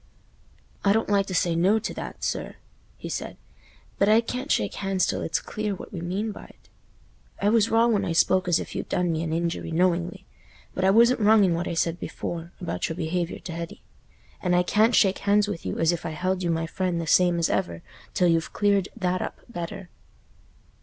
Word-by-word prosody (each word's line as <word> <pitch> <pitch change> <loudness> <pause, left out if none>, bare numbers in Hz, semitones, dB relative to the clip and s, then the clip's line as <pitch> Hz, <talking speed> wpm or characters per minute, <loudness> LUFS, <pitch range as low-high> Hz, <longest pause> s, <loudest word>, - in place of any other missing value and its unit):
"I 200 - +4
don't 225 0 0
like 200 -1 +2
to 185 - -3
say 175 -1 +2
'No' 190 +6 +3
to 220 - -4
that, - - -7
sir," - - -3 0.4
he - - -7
said, - - -5 0.6
"but 200 - +4
I 220 +1 +6
can't 250 +4 -4
shake - - +1
hands 195 -2 0
till - - -2
it's 165 - -1
clear 215 -2 -3
what - - -11
we 175 - -5
mean 195 +6 -2
by't. - - -14 0.7
I 200 - +2
was 225 0 +3
wrong 230 +1 +4
when 205 -2 +1
I 185 - -2
spoke 185 +2 +3
as 175 - +3
if - - -7
you'd - - -5
done 180 -1 +1
me 160 0 -1
an 165 -1 -3
injury 170 +1 -2
knowingly, 180 +2 0 0.5
but 185 - -2
I 190 - +5
wasn't 235 +5 +5
wrong 215 0 +5
in 180 -3 +3
what 170 +1 -2
I - - -3
said 165 +1 0
before, 170 0 -5
about 175 - -3
your 160 - -3
behaviour 175 +1 -2
t' 170 - -8
Hetty, 170 0 -7 0.6
and 180 -1 +1
I 180 - +4
can't 215 +5 +3
shake 195 -2 +3
hands 205 +1 +2
with 200 -5 -5
you - - -3
as 165 0 +3
if 175 -1 -3
I 155 - -5
held 185 +2 -1
you 175 - -1
my 165 0 0
friend 180 +1 -2
the 165 - -3
same 175 +2 +4
as 170 - +2
ever 85 -1 -2 0.3
till 180 - +3
you've 165 -1 +1
cleared 200 -2 +2
that 185 -3 -1
up - - -5
better." 175 -3 -6
185 Hz, 215 wpm, -25 LUFS, 170-205 Hz, 0.7 s, I